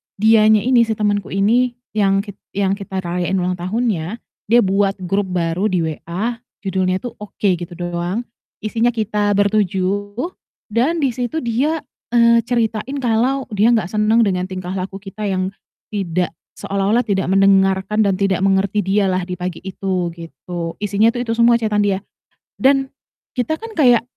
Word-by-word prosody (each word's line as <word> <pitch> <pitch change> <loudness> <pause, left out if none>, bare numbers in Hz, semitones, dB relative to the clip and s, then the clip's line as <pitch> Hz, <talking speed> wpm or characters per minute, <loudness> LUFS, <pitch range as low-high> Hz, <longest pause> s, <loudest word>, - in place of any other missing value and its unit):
dianya 215 0 +5
ini, 245 -2 +4
si 220 - 0
temenku 205 -2 0
ini 240 +5 +2 0.2
yang 195 -2 +2
kit 200 -2 -10 0.2
yang 195 -1 +1
kita 190 -2 -4
rayain 175 +2 -1
ulang 180 0 0
tahunnya, 205 0 -2 0.3
dia 235 +3 +5
buat 195 0 +1
grup 195 +2 0
baru 180 +2 0
di 180 -4 0
WA 175 +9 -3 0.3
judulnya 185 -1 0
tuh 245 - -5
"Oke", 200 -2 -1
gitu 175 0 -7
doang, 175 +5 -3 0.4
isinya 230 +2 +1
kita 210 -2 0
ber-7, 205 0 0 0.6
dan 275 +10 +1
di 265 - +2
situ 250 +6 -3
dia, 275 +7 0 0.3
eee, 235 0 +6
ceritain 235 +2 -1
kalau 250 +4 +1
dia 215 +3 +3
gak 210 -6 0
seneng 215 +2 +3
dengan 185 -3 0
tingkah 185 -1 -5
laku 190 0 -4
kita 205 +1 -5
yang 185 0 -1 0.4
tidak 180 -3 -1 0.2
seolah-olah 200 +4 0
tidak 195 -5 0
mendengarkan 195 +2 +3
dan 195 - +2
tidak 195 -1 +1
mengerti 195 +1 +2
dialah 190 -1 +2
di 180 - -5
pagi 180 -1 -4
itu, 185 -2 -2
gitu. 170 0 -7
Isinya 210 +2 +2
tuh 245 +1 -2
itu 230 - -1
semua 235 +1 +5
chat-an 215 -2 0
dia. 200 -2 +2 0.6
Dan, 270 0 +3 0.4
kita 250 +4 0
kan 455 0 -8
kayak 245 -6 +5
205 Hz, 155 wpm, -19 LUFS, 185-230 Hz, 0.6 s, eee